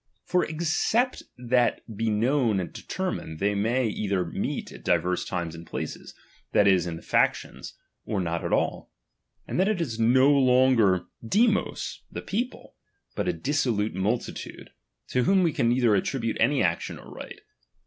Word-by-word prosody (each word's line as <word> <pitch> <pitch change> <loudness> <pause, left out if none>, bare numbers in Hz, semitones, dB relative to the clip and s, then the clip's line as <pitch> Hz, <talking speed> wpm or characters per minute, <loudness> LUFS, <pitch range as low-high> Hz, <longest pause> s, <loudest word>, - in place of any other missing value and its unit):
For 180 - +2
except 170 +10 0 0.2
that 125 0 +1
be 115 +2 0
known 115 0 +2
and 90 - -5
detei'mined, 180 - -4
they 100 +4 +1
may 115 +6 +1
either 100 -3 -1
meet 85 - -4
at - - -12
divers 90 0 +1
times 85 -3 -3
and 85 0 -9
places, - - -6 0.4
that 100 - +5
is, 90 -3 +4
in 80 -1 -5
factions, - - 0 0.3
or 100 - -2
not 85 -2 -2
at - - -3
all; - - -1 0.6
and - - -2
then 190 - +3
it 215 -4 0
is 120 -9 -3
no 130 +5 +5
longer 125 -8 +4 0.2
Siifioc, 215 - +1
the - - -6
people, 240 +6 -4 0.4
but - - -2
a - - +1
dissolute 115 - 0
multitude, 105 +6 -3 0.4
to 125 -1 +1
whom 190 +3 +4
we 165 -3 +2
can 125 -7 +1
neither 120 -2 +3
attribute 115 +3 -1
any 135 +5 +3
action 85 -1 -1
or - - -13
right. - - -9
120 Hz, 160 wpm, -26 LUFS, 100-145 Hz, 0.6 s, that